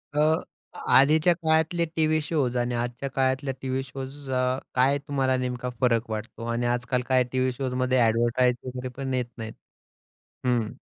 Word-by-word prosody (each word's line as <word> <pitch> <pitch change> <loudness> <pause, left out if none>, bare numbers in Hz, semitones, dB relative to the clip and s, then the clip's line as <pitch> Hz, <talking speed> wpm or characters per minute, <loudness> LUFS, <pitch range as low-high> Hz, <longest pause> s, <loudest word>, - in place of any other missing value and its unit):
अ, 150 - +2 0.7
आधीच्या 155 +5 +5
काळातले 160 +1 +1
TV 155 0 +2
shows 140 -6 0
आणि 120 0 0
आजच्या 120 +3 -3
काळातल्या 135 +1 0
टी-व्ही 130 0 -2
शोज 135 +1 -8
अ, 130 0 +1 0.2
काय 135 +3 +4
तुम्हाला 135 -2 +1
नेमका 125 0 -3
फरक 115 -2 +2
वाटतो? 110 +2 -5
आणि 115 +1 -1
आज-काल 125 +1 0
काय 130 -1 +4
टी-व्ही 130 0 +1
शोजमध्ये 130 0 0
एडवर्टाइज 120 +2 +2
वगैरे 130 0 -5
पण 135 -1 -3
येत 125 -1 0
नाहीत. 110 -1 -6 0.9
हम्म. 120 -3 +1
130 Hz, 150 wpm, -26 LUFS, 125-135 Hz, 0.9 s, आधीच्या